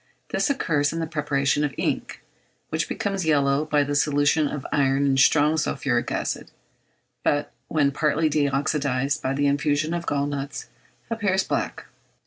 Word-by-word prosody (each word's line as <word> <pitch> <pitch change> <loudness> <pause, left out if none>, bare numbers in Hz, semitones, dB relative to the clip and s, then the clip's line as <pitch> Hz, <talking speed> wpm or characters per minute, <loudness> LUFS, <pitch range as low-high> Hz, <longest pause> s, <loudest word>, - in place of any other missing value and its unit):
This - - 0
occurs 150 - +1
in 165 - -4
the 165 - -1
preparation 150 -2 0
of 145 - -2
ink, - - -2 0.5
which - - -2
becomes 195 -2 -2
yellow 145 -2 +2
by 150 -1 +2
the 145 +1 -3
solution 145 +1 +2
of 140 -1 -5
iron 140 -1 +2
in 135 -1 +2
strong 150 +3 +4
sulphuric 130 -5 -1
acid, - - -3 0.7
but 145 0 0 0.2
when 145 -3 +2
partly 150 +2 +1
de 145 -1 +1
oxydised 140 0 0
by 130 - -1
the 145 +1 +1
infusion 145 +2 +1
of 170 -1 -4
gall 140 -1 0
nuts, 145 -1 -4 0.5
appears 200 -4 +1
black. - - -3
145 Hz, 155 wpm, -24 LUFS, 140-155 Hz, 0.7 s, strong